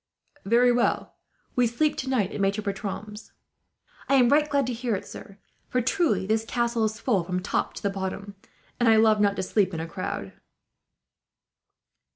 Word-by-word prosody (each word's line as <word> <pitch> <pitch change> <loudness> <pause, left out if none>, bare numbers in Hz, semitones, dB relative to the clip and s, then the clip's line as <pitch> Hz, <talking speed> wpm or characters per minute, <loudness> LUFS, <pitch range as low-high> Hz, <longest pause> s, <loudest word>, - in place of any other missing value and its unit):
"Very 240 +4 +4
well. 240 0 0 0.4
We 245 -1 +3
sleep 295 +7 0
tonight 255 -7 -1
at - - -4
Maitre 200 +2 0
Bertram's." 205 +1 -6 0.8
"I 275 - +4
am 250 -3 +5
right 300 +2 +3
glad 280 -2 +1
to 250 - -2
hear 235 -1 -2
it, 195 - -6
sir; 200 - -11 0.3
for 250 - +1
truly 250 - +1
this 220 +2 +1
castle 235 0 -1
is 215 +1 -3
full 210 -9 +1
from 180 +1 -3
the 180 - -4
top - - -1
to - - -8
the 200 - 0
bottom, 195 +1 -5 0.5
and 240 -1 +4
I 225 - +6
love 220 -1 +4
not 200 -1 +3
to - - -2
sleep 190 -2 +1
in - - -3
a 160 - -3
crowd." 185 +3 -5
220 Hz, 185 wpm, -26 LUFS, 195-245 Hz, 0.8 s, I